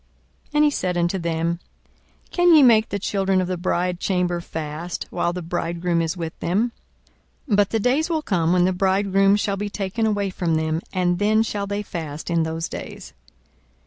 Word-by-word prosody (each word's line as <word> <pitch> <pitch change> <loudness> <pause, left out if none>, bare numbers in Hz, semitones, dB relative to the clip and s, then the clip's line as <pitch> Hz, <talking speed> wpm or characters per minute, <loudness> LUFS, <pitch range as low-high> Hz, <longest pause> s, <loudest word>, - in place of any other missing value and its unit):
42:005:034 - - -32
And 300 - +5
he 300 - +5
said 180 -9 -1
unto 175 +2 0
them, 170 0 -1 0.7
Can 350 -2 +5
ye 300 - +8
make 225 -3 +5
the 200 - -2
children 195 -1 0
of 185 - 0
the 185 - -1
bridechamber 180 0 -1
fast, 160 +2 -5
while 175 - 0
the 180 0 -5
bridegroom 170 0 -1
is 165 +2 -2
with 165 -2 -4
them? 210 +8 0 0.8
42:005:035 215 - +2
But 205 -1 +3
the 225 - 0
days 275 - +1
will 320 -2 -1
come, 170 - +1
when 180 0 +4
the 185 - +2
bridegroom 195 +1 +3
shall 205 -1 -1
be 205 +1 -3
taken 205 +3 -2
away 205 -2 0
from 170 -3 -1
them, 160 +1 0
and 180 -2 0
then 215 +2 +3
shall 205 -3 -3
they 205 +1 -2
fast 160 -4 -6
in 170 -1 +2
those 160 0 -2
days. - - -8
185 Hz, 190 wpm, -22 LUFS, 170-205 Hz, 0.8 s, ye